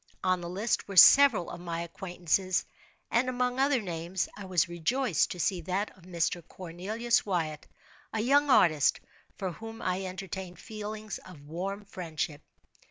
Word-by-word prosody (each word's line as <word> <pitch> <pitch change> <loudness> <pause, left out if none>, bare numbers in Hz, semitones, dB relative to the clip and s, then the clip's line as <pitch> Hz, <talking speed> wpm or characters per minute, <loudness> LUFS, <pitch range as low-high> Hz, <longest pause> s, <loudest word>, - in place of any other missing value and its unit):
On 185 -1 +2
the 170 - -5
list 205 +6 -1
were 200 - -6
several 255 -4 +8
of - - -7
my 170 -1 -4
acquaintances, 180 +1 -1 0.5
and 245 +2 +2
among 250 0 -1
other 275 -1 +3
names, 175 -2 -3
I 205 - -8
was 180 -4 +2
rejoiced 175 - +1
to 180 - -6
see 180 +1 0
that 190 +5 -2
of 185 -2 -19
Mr. 175 -1 -1
Cornelius 205 +7 -1
Wyatt, 160 -6 -2 0.4
a 220 - -2
young 285 +6 +3
artist, 155 - +4 0.4
for 190 -2 -3
whom 225 +5 -9
I 185 +1 -2
entertained 185 -1 -6
feelings 215 +1 -6
of 165 -6 -14
warm 195 +6 -5
friendship. 160 -5 -4
185 Hz, 155 wpm, -29 LUFS, 170-215 Hz, 0.5 s, several